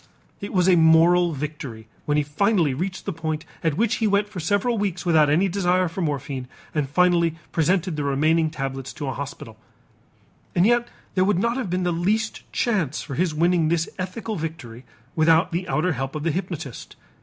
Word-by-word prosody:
It 200 - -6
was 180 -2 +2
a 185 - +6
moral 170 +2 +5
victory 140 -6 -6 0.2
when 150 0 +1
he 150 - +2
finally 165 0 +1
reached 180 +5 -4
the 200 - -2
point 155 -1 -4 0.2
at 160 -2 0
which 230 +1 +1
he 220 - +1
went 200 0 +2
for 205 -3 -7
several 205 +8 +1
weeks 190 -3 -2
without 155 -4 +4
any 170 +7 +3
desire 185 -1 +1
for 170 +3 -5
morphine 140 -4 -3 0.3
and 150 -3 -1
finally 170 0 +3 0.2
presented 175 +1 +1
the 150 - -2
remaining 155 +4 +2
tablets 135 -3 -5
to 145 - -6
a 135 - -2
hospital. 135 -5 -8 1.0
And 175 - +4
yet 240 +1 +3 0.3
there 185 - +3
would 200 -1 +2
not 235 +5 +1
have 250 -8 -3
been 180 +1 -1
the 175 - +1
least 210 +6 -1
chance 185 - 0
for 140 - -7
his 165 +2 0
winning 170 0 +2
this 165 0 +1
ethical 210 +4 -4
victory 155 -7 -7 0.3
without 165 +3 +4
the 180 +2 -2
outer 175 +1 +1
help 135 +1 -4
of 150 - -4
the 165 - +1
hypnotist. 165 - -5
165 Hz, 190 wpm, -23 LUFS, 150-185 Hz, 1.0 s, a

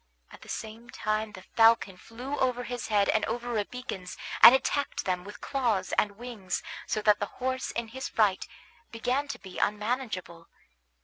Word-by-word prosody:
At - - -13
the - - -13
same 225 +2 -6
time 215 -1 -2
the 185 - -10
falcon 225 -4 +4
flew 245 +9 -6
over 250 -1 +1
his 245 0 -4
head 205 -2 +3
and 220 - +2
over 240 0 -3
Rabican's 205 -4 -4 0.2
and 245 - +12
attacked 285 +2 -1
them 180 -1 -1
with 205 +2 -10
claws 240 -8 0
and 200 -1 +1
wings, 230 -6 -4 0.2
so 215 - -1
that 210 -1 +5
the 205 - -1
horse 260 0 -2
in 235 -1 -3
his 260 +3 -5
fright 205 -4 +2 0.4
began 250 +5 -1
to 280 - -5
be 190 -2 -9
unmanageable. 210 -6 -2
225 Hz, 170 wpm, -29 LUFS, 205-245 Hz, 0.4 s, and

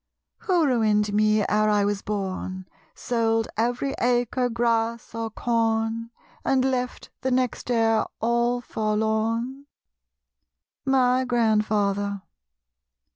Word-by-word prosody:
Who 355 -4 +2
ruined 215 -5 +2
me 215 0 +3
ere 215 +1 +2
I 205 -1 +3
was 205 -1 -1
born, 190 -2 -4 0.3
Sold 225 -2 0
every 245 +4 0
acre, 245 +1 +1
grass 230 -1 -1
or 230 0 -3
corn, 225 0 -1 0.3
And 260 -1 +2
left 250 -1 -2
the 260 - 0
next 255 -1 -1
heir 225 -2 +2
all 235 +1 +1
forlorn? 220 +5 -1 1.2
My 260 -1 +3
Grandfather. 210 -4 +1
225 Hz, 100 wpm, -25 LUFS, 215-245 Hz, 1.2 s, me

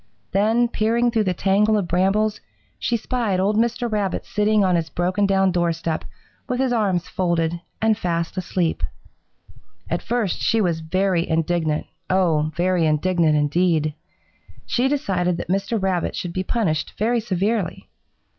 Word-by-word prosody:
Then, 220 +5 +3
peering 235 +2 +1
through 220 -2 +1
the 185 -1 0
tangle 205 +4 +3
of 195 -4 -1
brambles, 195 +5 +1 0.4
she 235 - 0
spied 225 -4 -1
old 200 +3 +1
Mr. 235 +2 +1
Rabbit 205 -4 -1
sitting 210 0 +2
on 185 -2 +3
his 165 -2 -1
broken 185 +3 0
down 195 -1 +3
doorstep 170 -2 -1 0.5
with 250 0 -1
his 260 -2 +1
arms 195 -6 0
folded 170 -2 -1 0.2
and 220 -1 +4
fast 170 -4 -2
asleep. 180 -2 -1 1.1
"At - - 0
first 235 -6 -1
she 225 - +2
was 175 -6 +1
very 180 +1 0
indignant, 160 -1 0 0.2
oh, 165 -5 +2
very 175 0 +2
indignant, 160 0 +2
indeed! 155 +1 +1 0.7
She 245 +2 +1
decided 185 - 0
that - - -6
Mr. 200 +4 0
Rabbit 190 -3 -1
should 175 -1 -4
be 185 - -1
punished 185 -7 -1
very 235 +3 +1
severely. 205 -2 -1
190 Hz, 145 wpm, -22 LUFS, 170-215 Hz, 1.1 s, and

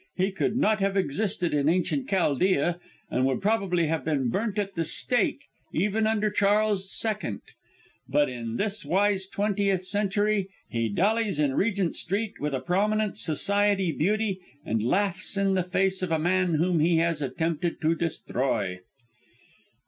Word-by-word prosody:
He 190 +2 0
could 195 +3 -1
not 215 -4 +2
have 195 0 0
existed 185 +1 0
in 145 0 +2
Ancient 185 - 0
Chaldea, 175 -1 +1 0.3
and 125 - +1
would 130 -2 0
probably 195 -5 +1
have 155 -2 -1
been 140 -5 0
burnt 215 - -2
at 200 -1 -2
the 165 - -1
stake 275 - +1 0.3
even 210 +5 +1
under 215 -1 +1
Charles 205 -1 +2 0.2
II.; 210 - -2 0.7
but 145 +2 +3
in 115 -2 -5
this 210 - -2
wise 195 0 +1
twentieth 200 -2 0
century 205 0 0 0.2
he 115 -2 -1
dallies 205 - +1
in 145 -3 +2
Regent 195 0 0
Street 205 +4 -2
with 145 -1 -2
a - - -1
prominent 210 +6 0
society 200 +2 +1
beauty 200 +4 0 0.3
and 110 0 -1
laughs 190 - 0
in 195 -1 +2
the 190 - +2
face 190 +1 0
of 185 -2 -2
a 160 - +3
man 180 +1 +1
whom 170 +2 +1
he 165 +2 +3
has 165 -2 +1
attempted 165 +4 -2
to 160 +1 +2
destroy!" 130 - -2
190 Hz, 155 wpm, -26 LUFS, 160-205 Hz, 0.7 s, but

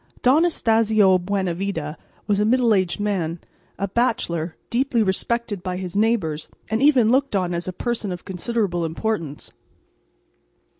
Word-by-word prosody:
Don 255 +3 +5
Anastacio 220 - +3
Buenavida 180 -4 -2 0.3
was 205 -1 +1
a - - +3
middle 235 +1 +3
aged 185 -1 +1
man, 180 -5 -1 0.4
a 200 - -1
bachelor, 175 -7 -1 0.2
deeply 245 -1 +2
respected 210 +1 -1
by 180 0 -3
his 185 -1 -6
neighbours, 200 -8 0 0.2
and 220 +2 +1
even 260 -6 +5
looked 275 -2 +2
on 180 -2 0
as 170 +1 -3
a - - -1
person 220 +1 -3
of 180 -1 -7
considerable 190 -2 -1
importance. 165 -3 -3
200 Hz, 140 wpm, -22 LUFS, 175-230 Hz, 0.4 s, Don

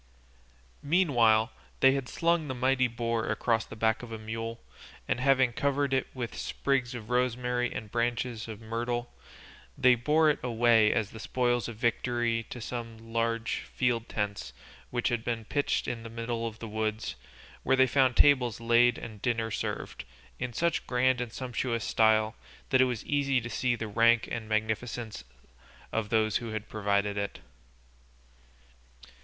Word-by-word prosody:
Meanwhile 130 -9 +3 0.3
they 135 - +6
had 135 -2 -2
slung 170 -2 +1
the 130 - -3
mighty 130 0 +2
boar 115 -1 -2
across 115 -3 +1
the - - -10
back 110 0 +1
of 120 -2 -9
a 110 - -4
mule, 115 +1 -5 0.5
and - - 0
having 130 -2 +3
covered 140 +1 0
it 130 - +1
with 120 -3 -4
sprigs 130 -3 -1
of 115 -1 -8
rosemary 125 0 0
and 105 -2 -6
branches 120 -1 -1
of 110 -2 -7
myrtle, 120 +2 -3 0.6
they 130 -1 +6
bore 150 +6 +3
it - - -4
away 115 -2 +4
as 110 -3 0
the 110 - -9
spoils 120 -1 0
of 120 - -6
victory 120 0 0
to 125 - -7
some 115 -1 -7
large 115 0 0
field 120 -2 -1
tents 105 -1 -3 0.4
which 120 0 0
had 120 -2 -1
been 115 -2 -3
pitched 145 +3 0
in 115 - -3
the 115 - -8
middle 115 0 -3
of 110 -1 -7
the 115 - -7
wood, 110 0 -2 0.5
where 135 - +2
they 130 0 +5
found 130 -1 +3
the - - +7
tables 125 -6 +3
laid 120 +1 +4
and 105 -3 -9
dinner 115 -2 0
served, 100 - -4 0.4
in 125 0 -3
such 170 +8 0
grand 125 0 +2
and 120 -2 -4
sumptuous 120 -1 -2
style 110 0 +3 0.4
that 130 - +5
it - - +6
was 125 -4 -3
easy 140 -2 +1
to 120 0 -7
see 125 -1 +1
the 115 -1 -4
rank 115 +2 +3
and 110 -2 -4
magnificence 110 - -2 0.7
of 110 -2 -2
those 110 -1 +2
who 120 - -6
had 110 0 -4
provided 100 -1 0
it. 100 - -3
120 Hz, 165 wpm, -29 LUFS, 110-125 Hz, 0.7 s, the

